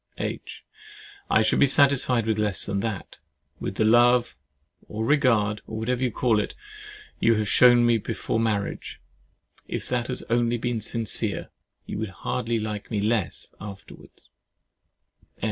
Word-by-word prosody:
H. -, -, -5 dB, 0.7 s
I -, -, +4 dB
should 110 Hz, -, +2 dB
be 140 Hz, -, +6 dB
satisfied 130 Hz, -4 st, +3 dB
with 110 Hz, -1 st, 0 dB
less 105 Hz, -4 st, 0 dB
than 100 Hz, -1 st, -2 dB
that—with 105 Hz, -2 st, -7 dB
the 110 Hz, -, +1 dB
love, 120 Hz, +2 st, +4 dB, 0.5 s
or 110 Hz, +1 st, -4 dB
regard, 115 Hz, -7 st, +2 dB
or 110 Hz, -, -6 dB
whatever 120 Hz, +3 st, -1 dB
you 130 Hz, -, +2 dB
call 115 Hz, -1 st, +1 dB
it, -, -, -3 dB, 0.6 s
you 115 Hz, -, +4 dB
have 105 Hz, -1 st, -1 dB
shown 120 Hz, +2 st, +6 dB
me 120 Hz, -1 st, +3 dB
before 110 Hz, -, -3 dB
marriage, 105 Hz, -3 st, -2 dB, 0.7 s
if -, -, -5 dB
that 125 Hz, -1 st, -1 dB
has 125 Hz, -, -1 dB
only 120 Hz, 0 st, +1 dB
been 120 Hz, -1 st, -2 dB
sincere. 115 Hz, 0 st, -1 dB, 0.3 s
You -, -, -5 dB
would 110 Hz, -1 st, -3 dB, 0.2 s
hardly 115 Hz, -2 st, -1 dB
like 105 Hz, -1 st, -5 dB
me 105 Hz, -, -1 dB
less 105 Hz, -4 st, -1 dB
afterwards. 100 Hz, -1 st, -12 dB
115 Hz, 145 wpm, -25 LUFS, 105-120 Hz, 0.7 s, be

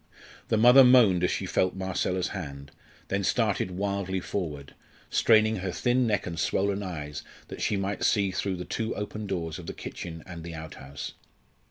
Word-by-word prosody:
The 110 Hz, -, +2 dB
mother 125 Hz, +4 st, +8 dB
moaned 115 Hz, -8 st, +6 dB
as 90 Hz, -, +3 dB
she -, -, -2 dB
felt 95 Hz, 0 st, +1 dB
Marcella's 95 Hz, -1 st, -1 dB
hand, 70 Hz, -7 st, -7 dB, 0.4 s
then 100 Hz, 0 st, 0 dB
started 105 Hz, -2 st, +1 dB
wildly 95 Hz, 0 st, -2 dB
forward, 75 Hz, -7 st, -4 dB, 0.4 s
straining 110 Hz, -1 st, +4 dB
her 95 Hz, 0 st, -3 dB
thin 125 Hz, +5 st, +1 dB
neck 105 Hz, -3 st, 0 dB
and 85 Hz, -2 st, -5 dB
swollen 100 Hz, +4 st, 0 dB
eyes 75 Hz, -6 st, -5 dB, 0.3 s
that -, -, -7 dB
she 105 Hz, -, +1 dB
might 100 Hz, +1 st, -2 dB
see 100 Hz, -3 st, +2 dB
through 95 Hz, +1 st, -2 dB
the 90 Hz, 0 st, -6 dB
two 115 Hz, 0 st, -3 dB
open 105 Hz, 0 st, -5 dB
doors 85 Hz, -4 st, -3 dB
of 85 Hz, -, -10 dB
the -, -, -4 dB
kitchen 80 Hz, -3 st, -7 dB
and 85 Hz, -3 st, -8 dB
the 85 Hz, 0 st, -7 dB
outhouse. 75 Hz, -3 st, -8 dB
95 Hz, 175 wpm, -27 LUFS, 85-105 Hz, 0.4 s, mother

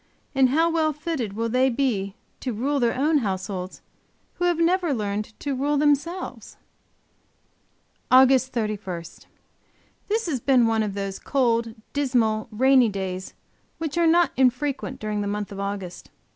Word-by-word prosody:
And 265 Hz, -2 st, +4 dB
how 320 Hz, +5 st, +3 dB
well 315 Hz, -2 st, +1 dB
fitted 290 Hz, -8 st, -3 dB
will 230 Hz, +2 st, -2 dB
they 255 Hz, +3 st, +2 dB
be 230 Hz, -7 st, -1 dB, 0.2 s
to 255 Hz, -, -3 dB
rule 275 Hz, +6 st, -1 dB
their 235 Hz, -2 st, +1 dB
own 300 Hz, +3 st, +3 dB
households 190 Hz, -3 st, -4 dB, 0.6 s
who 355 Hz, -, +1 dB
have 350 Hz, -2 st, +2 dB
never 340 Hz, -2 st, +2 dB
learned 210 Hz, 0 st, -4 dB
to 285 Hz, -, -2 dB
rule 285 Hz, +3 st, 0 dB
themselves? 300 Hz, +5 st, -1 dB, 1.5 s
AUG. 260 Hz, +1 st, +7 dB
31. 215 Hz, -8 st, -4 dB, 1.0 s
This 440 Hz, +2 st, 0 dB
has 300 Hz, -7 st, -1 dB
been 255 Hz, -1 st, +3 dB
one 225 Hz, -1 st, +2 dB
of 205 Hz, -2 st, -2 dB
those 195 Hz, -1 st, -4 dB
cold, 235 Hz, -4 st, 0 dB, 0.2 s
dismal, 240 Hz, -6 st, +1 dB
rainy 255 Hz, +2 st, +4 dB
days 190 Hz, -2 st, -5 dB, 0.4 s
which 320 Hz, -2 st, -4 dB
are 340 Hz, -1 st, +3 dB
not 340 Hz, +1 st, +4 dB
infrequent 265 Hz, +1 st, 0 dB
during 210 Hz, -1 st, -2 dB
the 205 Hz, -, -2 dB
month 205 Hz, 0 st, -3 dB
of 195 Hz, -, -7 dB
August. 200 Hz, -3 st, -5 dB
250 Hz, 145 wpm, -24 LUFS, 210-290 Hz, 1.5 s, AUG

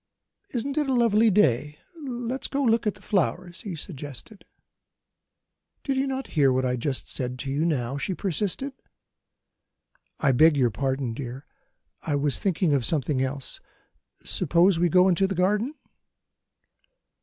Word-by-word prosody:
"Isn't 275 Hz, +5 st, -2 dB
it 295 Hz, -2 st, 0 dB
a 260 Hz, -, +2 dB
lovely 230 Hz, -2 st, +4 dB
day? 150 Hz, -, +2 dB, 0.2 s
Let's 255 Hz, -4 st, -4 dB
go 280 Hz, 0 st, -1 dB
and 235 Hz, -, +4 dB
look 225 Hz, -1 st, +1 dB
at 210 Hz, -, 0 dB
the -, -, -18 dB
flowers," 180 Hz, -2 st, -1 dB
he 200 Hz, -7 st, -5 dB
suggested. 150 Hz, -, -8 dB, 1.4 s
"Did 275 Hz, -, -1 dB
you 270 Hz, +1 st, +1 dB
not 265 Hz, 0 st, -3 dB
hear 140 Hz, -4 st, +4 dB
what 130 Hz, 0 st, +1 dB
I 125 Hz, 0 st, +1 dB
said 130 Hz, -1 st, -2 dB
to 135 Hz, +1 st, -4 dB
you 140 Hz, -, -1 dB
just 165 Hz, +2 st, +2 dB
now?" 130 Hz, -3 st, -1 dB
she 185 Hz, +6 st, -2 dB
persisted. 205 Hz, -, -2 dB, 1.5 s
"I 140 Hz, -4 st, +3 dB
beg 155 Hz, +4 st, +5 dB
your 125 Hz, -4 st, +3 dB
pardon, 130 Hz, 0 st, -2 dB
dear; 130 Hz, +3 st, -7 dB, 0.6 s
I 150 Hz, -, -1 dB
was 145 Hz, -1 st, 0 dB
thinking 180 Hz, -4 st, +1 dB
of 135 Hz, -3 st, +2 dB
something 145 Hz, 0 st, 0 dB
else. 135 Hz, 0 st, -3 dB, 0.7 s
Suppose 175 Hz, +1 st, +3 dB
we 175 Hz, 0 st, +3 dB
go 180 Hz, +3 st, +5 dB
into 190 Hz, +1 st, +3 dB
the 195 Hz, -, -3 dB
garden?" 210 Hz, +10 st, +1 dB
170 Hz, 155 wpm, -26 LUFS, 135-215 Hz, 1.5 s, beg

